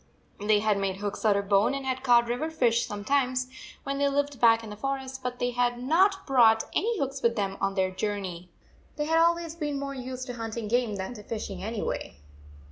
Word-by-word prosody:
They 210 0 +3
had 210 -2 +2
made 195 -1 -1
hooks 200 +1 -5
out 205 -2 +4
of 200 0 -2
bone 200 +6 +3
and 275 -1 -5
had 260 0 -2
caught 240 -2 +4
river 245 +7 -1
fish 240 -7 +1
sometimes 255 +4 0 0.4
when 275 0 -3
they 280 0 +3
lived 285 -1 -1
back 230 -1 +5
in 215 - -8
the - - -6
forest, 265 +3 -4
but 250 0 -4
they 245 0 -1
had 245 0 +1
not 365 +10 +2
brought 230 -5 +5
any 455 +2 +1
hooks 275 -3 -3
with 235 0 +2
them 195 -3 -1
on 195 0 0
their 190 -1 +1
jour 205 +2 -2
148 185 -4 -5
ney. 180 - -21 0.5
They 295 - -2
had 325 +1 +3
always 335 -1 +2
been 295 -4 -3
more 275 0 -4
used 255 -1 -6
to 250 - -6
hunting 225 -1 -5
game 235 -1 +1
than 190 +4 -4
to 215 - -10
fishing, 205 -3 -5
anyway. 220 - -4
245 Hz, 220 wpm, -27 LUFS, 210-275 Hz, 0.5 s, back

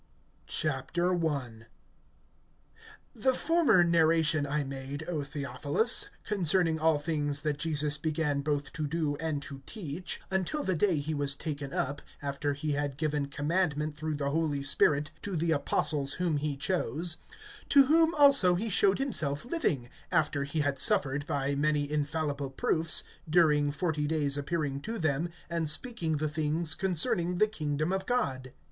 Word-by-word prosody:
I. 145 -4 0 2.3
THE 255 +2 +1
former 325 - +4
narration 160 -3 +3
I 150 +1 -1
made, 135 +2 -6
O 165 -4 -2
Theophilus, 145 - +1
concerning 175 -4 +2
all 160 -1 +3
things 145 -1 -1
that 150 -1 -2
Jesus 150 -2 +1
began 150 -2 -1
both 145 -1 -2
to 155 -2 -2
do 155 -1 -1
and 155 -2 -3
to 135 -1 -9
teach, 180 -4 -5
(2)until 190 - -1
the 190 - +1
day 185 +2 +2
when 145 - -1
he 155 +2 -3
was 145 -1 -1
taken 145 -2 -5
up, 140 +1 -2 0.2
after 145 0 -2
he 150 +2 -3
had 145 -1 -2
given 150 -2 -1
commandment, 150 +1 -1
through 155 0 -3
the 140 -1 -2
Holy 150 -3 -1
Spirit, 145 +1 +3
to 200 -3 -4
the 165 +1 0
apostles 145 -1 +1
whom 175 -4 0
he 145 -1 -2
chose; 170 +1 -1 0.5
(3)to 280 -1 +7
whom 325 +3 +3
also 275 -11 +6
he 215 +5 -2
showed 195 +1 +3
himself 155 - 0
living, 165 - -1 0.2
after 150 -4 +1
he 150 +2 -2
had 140 -2 0
suffered, 140 +2 +2
by 140 0 -1
many 145 0 +1
infallible 145 -2 -2
proofs, 160 +4 +1 0.3
during 150 -3 +4
forty 150 0 -1
days 145 -3 0
appearing 145 -1 -2
to 225 +8 -4
them, 155 -1 0 0.2
and 165 -2 0
speaking 165 -3 0
the 155 +1 -1
things 155 +1 -1
concerning 180 -1 0
the 215 - +4
kingdom 155 -5 -2
of 190 0 -2
God. 130 - -1
155 Hz, 155 wpm, -29 LUFS, 145-170 Hz, 2.3 s, 3)to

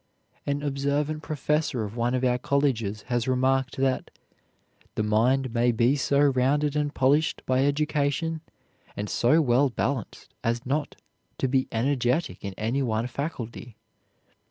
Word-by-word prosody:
An 145 0 -1
observant 145 +2 -1
professor 150 -4 -1
of 105 +1 -6
one 120 +1 0
of 130 - -1
our 125 -1 +2
colleges 125 -7 0
has 120 0 -1
remarked 130 0 +1
that 135 -1 0 0.9
"the 110 - 0
mind 120 +4 +2
may 120 0 +3
be 120 +4 +2
so 140 0 +1
rounded 145 +2 +2
and 150 -1 0
polished 145 +3 +2
by 130 +1 +2
education, 150 +2 0 0.6
and 105 0 -3
so 155 +7 +3
well 130 +2 +3
balanced, 130 -1 -3
as 115 +1 -1
not 145 +3 -2 0.4
to 135 - 0
be 130 0 +1
energetic 125 - 0
in 100 -2 -5
any 115 +6 -1
one 115 -3 0
faculty. 125 -4 -6
130 Hz, 140 wpm, -26 LUFS, 120-145 Hz, 0.9 s, may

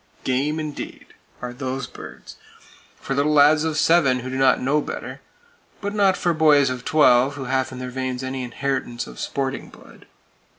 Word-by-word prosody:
"Game" 140 +5 0
indeed, 155 -2 -7 0.3
are 125 0 -4
those 130 +1 -4
birds,—for 135 - -11
little 145 +2 +1
lads 150 +1 +5
of 160 -1 -1
seven 140 -7 +3
who 130 +1 -6
do - - -4
not 135 -1 +3
know 145 +4 +1
better; - - -7 0.6
but 200 0 -4
not 200 -3 +3
for 175 -1 +1
boys 150 -4 +4
of 125 -1 -5
twelve 135 -3 +4
who 140 - -6
have 130 +1 -1
in 130 - -8
their 125 0 -6
veins 130 0 -3
any 130 0 -4
inheritance 125 -1 -3
of - - -12
sporting 135 -1 -3
blood. - - -17
135 Hz, 170 wpm, -22 LUFS, 130-150 Hz, 0.6 s, lads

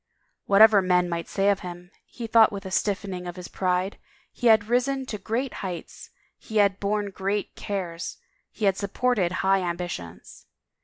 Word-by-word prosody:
Whatever 205 0 +7
men 180 -1 +2
might 170 -1 -3
say 195 0 +1
of 200 -1 +2
him, 175 0 -9 0.2
he 240 - -7
thought 225 0 +5
with 200 -1 -7
a 190 - -6
stiffening 190 -2 -2
of 175 - -6
his 180 -2 -8
pride, 185 +1 -1 0.3
he 245 - -1
had 220 -2 +6
risen 260 +3 +1
to 215 -4 -5
great 240 +7 -2
heights, 180 -4 -7 0.3
he 220 - -5
had 200 -2 +3
borne 205 0 -1
great 195 +2 -3
cares, 180 -4 -4 0.3
he 215 - -4
had 195 -1 +3
supported 205 -2 0
high 195 0 +4
ambitions. 170 - -6
195 Hz, 165 wpm, -25 LUFS, 180-215 Hz, 0.3 s, Whatever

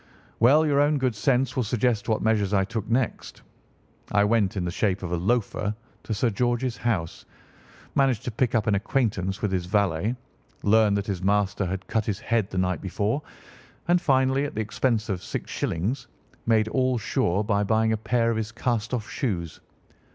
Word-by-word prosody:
"Well, 145 +7 +5
your 145 -2 +3
own 145 +1 +3
good 130 -3 0
sense 125 +4 +1
will 130 - +1
suggest 120 0 0
what 110 - +1
measures 105 -3 +2
I 95 -1 +3
took 110 +1 -4
next. 120 0 -2 0.7
I 100 0 +4
went 105 -2 +2
in 90 - -1
the 85 - -2
shape 95 0 0
of 90 - -4
a - - +1
loafer 105 +2 0 0.3
to 110 - -4
Sir 115 +3 +1
George's 120 +2 0
house, 100 -9 -2 0.7
managed 135 -5 +2
to 125 - -3
pick 120 +2 0
up 110 - +2
an 110 - +2
acquaintance 100 -3 -1
with 105 - +1
his 90 -2 -1
valet, 100 +2 +1 0.5
learned 105 -1 +4
that 100 - -2
his 95 -4 -3
master 100 0 +1
had 95 +1 -4
cut 110 -2 -1
his 105 -3 -1
head 115 -4 0
the 95 - -5
night 90 0 0
before, 105 - -1 0.7
and, 175 0 +3
finally, 130 0 +2
at 145 - -6
the 110 - 0
expense 110 +1 0
of 95 -5 -2
six - - -5
shillings, 105 +12 -2 0.4
made 110 -2 +3
all 130 +1 +1
sure 100 -2 0
by 105 -1 +1
buying 110 +2 +2
a - - 0
pair 115 +1 +1
of 115 - -1
his 110 0 -3
cast 115 0 -1
off 110 -2 -4
shoes. 85 - -3
110 Hz, 190 wpm, -25 LUFS, 100-120 Hz, 0.7 s, Well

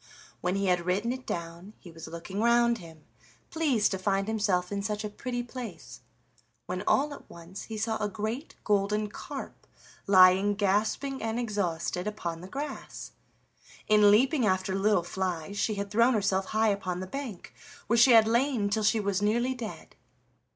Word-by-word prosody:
When 180 +2 -1
he 195 0 0
had 180 -2 +1
written 200 +6 0
it 255 0 -6
down 170 +4 -6
he 175 - -13
was 165 0 -10
looking 170 +4 -6
round 235 0 +3
him, 160 -3 -13 0.5
pleased 280 -10 +1
to 190 - -2
find 195 +1 0
himself 200 -5 0
in 200 0 -2
such 210 +1 -3
a 210 - -4
pretty 245 +3 -4
place, 235 -8 -9 0.6
when 180 +1 -4
all 290 +2 +2
at - - -13
once 170 +3 -10
he 220 - -6
saw 220 +1 -1
a 210 - 0
great 220 +8 -5
golden 210 +1 +1
carp - - -8 0.4
lying 190 +1 +6
gasping 215 +7 0
and 225 +1 -2
exhausted 180 -5 -2
upon 170 -6 -4
the 180 - -9
grass. 280 +7 -6 0.8
In 210 -1 +6
leaping 255 +6 +4
after 190 -2 +1
little 195 -1 +2
flies 185 +1 -3
she 215 - 0
had 200 0 -4
thrown 235 +3 +4
herself 195 -2 +1
high 220 +2 +1
upon 185 -3 -2
the 185 - -4
bank, 240 -3 -7 0.3
where 235 - +1
she 235 +2 +7
had 225 -1 +7
lain 235 -3 +1
till 220 +1 +1
she 215 +2 +3
was 200 -1 -1
nearly 240 +5 +1
dead. 235 -4 -8
205 Hz, 170 wpm, -28 LUFS, 185-230 Hz, 0.8 s, she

